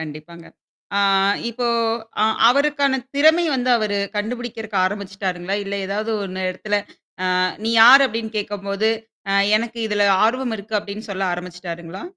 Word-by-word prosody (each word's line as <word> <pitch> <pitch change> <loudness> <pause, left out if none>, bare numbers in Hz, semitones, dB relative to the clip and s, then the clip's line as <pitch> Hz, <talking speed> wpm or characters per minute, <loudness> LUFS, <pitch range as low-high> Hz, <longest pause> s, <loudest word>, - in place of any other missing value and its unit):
கண்டிப்பாங்க. 160 +2 -9 0.5
ஆ - - +3 0.5
இப்போ 240 +1 -3 0.6
அ - - +5 0.2
அவருக்கான 280 +1 +2 0.2
திறமை 315 +4 +4
வந்து 255 -1 0
அவரு 210 -3 -1 0.2
கண்டுபிடிக்கிறக்கு 225 -1 -4
ஆரம்பிச்சுட்டாருங்களா? 195 -2 -4
இல்ல 200 - -4
ஏதாவது 210 +3 -3
ஒண்ணு 185 0 -5
இடத்துல 205 +3 -2 0.6
ஆ - - +2 0.2
நீ 225 - 0
யார் 270 +4 +9
அப்டின்னு 225 -2 -5
கேட்கும்போது, 205 +1 -2 0.4
அ - - +1 0.2
எனக்கு 230 +1 -5
இதுல 205 -1 +1 0.2
ஆர்வம் 245 0 -1
இருக்கு 210 +2 -3
அப்டின்னு 205 +2 -8
சொல்ல 195 0 -3
ஆரம்பிச்சுட்டாருங்களா? 175 - -7
210 Hz, 135 wpm, -21 LUFS, 190-235 Hz, 0.6 s, யார்